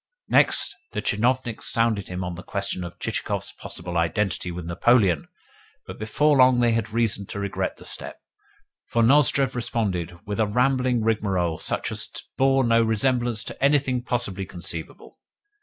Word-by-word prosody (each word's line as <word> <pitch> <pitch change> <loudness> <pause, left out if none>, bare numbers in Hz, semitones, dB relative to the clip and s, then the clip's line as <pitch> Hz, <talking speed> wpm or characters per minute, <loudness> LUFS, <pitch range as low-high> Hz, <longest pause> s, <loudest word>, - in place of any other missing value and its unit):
Next, 400 - +3 0.2
the - - -2
tchinovniks 120 +2 0
sounded 115 -4 +1
him 90 0 -4
on 90 0 -4
the 85 - -8
question 100 -2 -3
of 85 0 -8
Chichikov's - - -3
possible 85 0 -5
identity 90 +3 -1
with 90 -1 -6
Napoleon; 90 -1 +2 0.6
but - - -9
before 145 +8 +2
long 130 -1 +6
they 120 -1 +3
had 115 -2 -1
reason 110 -3 0
to 100 - -5
regret 100 -1 -3
the - - -12
step, - - -3 0.7
for 115 - +1
Nozdrev 135 +1 +4
responded 100 -8 -2
with 105 +1 -4
a 110 - +3
rambling 125 +1 +1
rigmarole 95 -7 0
such - - -1
as - - -2 0.3
bore 135 0 +3
no 115 -1 +4
resemblance 115 +1 +1
to - - -7
anything 140 -3 +2
possibly 100 -7 -2
conceivable. 85 -3 -7
110 Hz, 155 wpm, -24 LUFS, 95-125 Hz, 0.7 s, long